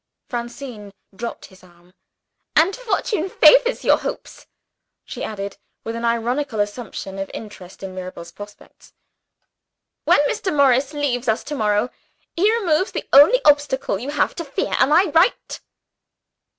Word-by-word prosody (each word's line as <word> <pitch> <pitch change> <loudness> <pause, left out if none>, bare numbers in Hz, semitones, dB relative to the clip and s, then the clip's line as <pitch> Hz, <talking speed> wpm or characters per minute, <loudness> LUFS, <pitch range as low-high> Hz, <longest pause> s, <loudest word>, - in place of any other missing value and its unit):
Francine 240 -3 -7 0.2
dropped 235 +4 -6
his 190 -1 -19
arm 175 0 -22 0.6
"And 335 +5 +4
fortune 420 -6 -2
favors - - +5
your - - +4
hopes," - - -7 0.6
she - - -7
added, 200 -2 -5 0.3
with 225 - -5
an 230 0 -3
ironical 235 +1 -1
assumption 205 -2 -4
of 195 - -4
interest 195 -4 -11
in 190 -1 -6
Mirabel's 180 -2 -8
prospects. 205 +3 -14 1.1
"When - - +5
Mr. 375 - -2
Morris 275 -1 +3
leaves 265 -4 -2
us 220 0 0
to 300 - -6
morrow, 215 0 0 0.4
he 400 +6 +3
removes 380 -5 +1
the - - -5
only 315 - +7
obstacle 280 -6 +2
you 260 - -6
have 290 0 0
to 335 - -3
fear. 280 -3 -3
Am 265 - +3
I 340 +2 +4
right?" 345 +8 +2
250 Hz, 140 wpm, -21 LUFS, 205-305 Hz, 1.1 s, only